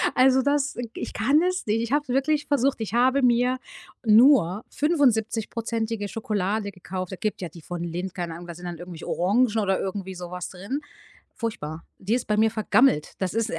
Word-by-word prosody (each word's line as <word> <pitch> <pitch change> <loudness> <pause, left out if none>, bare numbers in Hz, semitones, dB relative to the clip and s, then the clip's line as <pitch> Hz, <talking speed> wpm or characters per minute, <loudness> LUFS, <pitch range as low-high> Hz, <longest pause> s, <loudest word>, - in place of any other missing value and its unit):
Also, 260 +1 +5
das, 285 +1 +1
äh 245 - -4
ich - - -5
kann 275 +9 +3
es 365 +1 0
nicht. 215 0 +1
Ich 235 +3 -2
hab's 290 -2 +1
wirklich 285 +4 +1
versucht. 275 -4 +1
Ich 210 -2 -4
habe 255 +3 +3
mir 250 +1 +3 0.5
nur 220 - +5
75%ige 225 - 0
Schokolade 205 -1 -2
gekauft. 185 0 -6
Es - - -9
gibt 215 - -1
ja 180 - -3
die 170 +1 -13
von 175 +2 -5
Lindt, 180 +2 -4
keine 175 -2 -3
Ahnung, 175 +1 -9
da 170 - -6
sind 175 +2 -11
dann 175 -1 -5
irgendwelche 175 -2 -8
Orangen 210 +9 +3
oder 195 -3 +1
irgendwie 190 0 -4
so 175 -1 -7
was 180 -1 -5
drin. 200 +11 -5 0.5
Furchtbar. 165 -9 -5
Die 205 +5 -1
ist 250 - -1
bei 210 - +2
mir 220 +1 +4
vergammelt. 215 - +3
Das 190 -1 -2
ist, 225 0 0
äh, 165 - -3
220 Hz, 200 wpm, -25 LUFS, 185-255 Hz, 0.5 s, Also